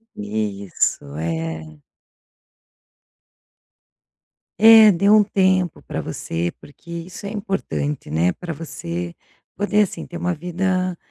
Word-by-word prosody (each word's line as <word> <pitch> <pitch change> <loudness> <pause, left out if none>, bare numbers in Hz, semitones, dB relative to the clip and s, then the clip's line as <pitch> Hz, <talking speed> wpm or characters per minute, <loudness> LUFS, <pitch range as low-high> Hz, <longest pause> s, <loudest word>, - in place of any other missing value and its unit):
Isso. 100 -2 -1
É. 80 -2 -4 2.8
É. 220 -1 +9
Dê 200 +2 +2
um 215 0 +7
tempo 185 -4 +1
pra - - -4
você, 85 +1 -3
porque 160 +3 -15
isso 170 +4 -7
é 200 - -3
importante, 195 - -3
né, 85 +3 +2
pra 175 -2 -6
você 85 - -5 0.4
poder, 205 +1 +2
assim, 190 - -5
ter 170 - -8
uma 175 +1 -1
vida 180 +2 -1
170 Hz, 110 wpm, -21 LUFS, -, 2.8 s, É